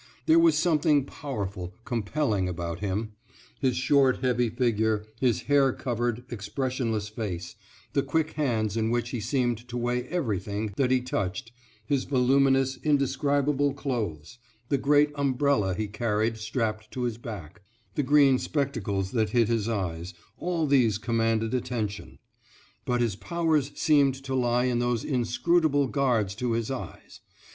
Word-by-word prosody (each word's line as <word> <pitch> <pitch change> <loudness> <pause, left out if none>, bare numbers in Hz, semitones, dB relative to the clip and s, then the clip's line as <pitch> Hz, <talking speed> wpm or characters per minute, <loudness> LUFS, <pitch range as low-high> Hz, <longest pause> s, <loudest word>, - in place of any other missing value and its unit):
There 325 +1 +6
was 335 -1 +5
something 150 -4 +3
powerful, 100 -12 -5
compelling, 115 -5 -1
about 85 -1 -4
him; 105 +2 -2 0.5
his 130 -3 +1
short, 135 0 +3
heavy 125 -2 +2
figure, 110 -3 0
his 125 -4 +2
hair 140 -2 +4
covered, 120 -1 -2
expressionless 120 -1 -2
face, 95 -5 -5 0.4
the 140 - +3
quick 155 +3 0
hands 115 -8 -1
in 110 -1 0
which 120 0 -1
he 125 - -3
seemed 120 0 0
to 125 0 -5
weigh 120 +1 -1
everything 105 - -2
that 130 +1 +1
he 130 -1 +3
touched, 110 -3 -3 0.3
his 135 +2 0
voluminous, 135 0 +3
indescribable 140 0 +1
clothes, 120 - -4 0.3
the 140 - +1
great 145 +2 +4
umbrella 140 -8 +1
he 110 +2 -2
carried 110 +1 0
strapped 110 -1 -2
to 125 - -4
his 120 -2 -2
back, 100 -8 -8 0.3
the - - 0
green 140 -1 +5
spectacles 105 -10 -2
that 110 -3 +1
hid 115 0 +2
his 115 -1 0
eyes, 90 -4 -3 0.2
all 170 -3 0
these 125 -8 +3
commanded 115 0 0
attention. 115 -5 -3 0.7
But 125 -3 +1
his 115 -5 0
powers 160 - 0
seemed 145 -4 +3
to 135 -1 -4
lie 125 -1 +2
in 125 -2 +1
those 120 -2 0
inscrutable 145 +3 +2
guards 120 -9 +1
to 125 -1 -1
his 115 +2 -1
eyes. 130 - -8
120 Hz, 145 wpm, -27 LUFS, 110-140 Hz, 0.7 s, There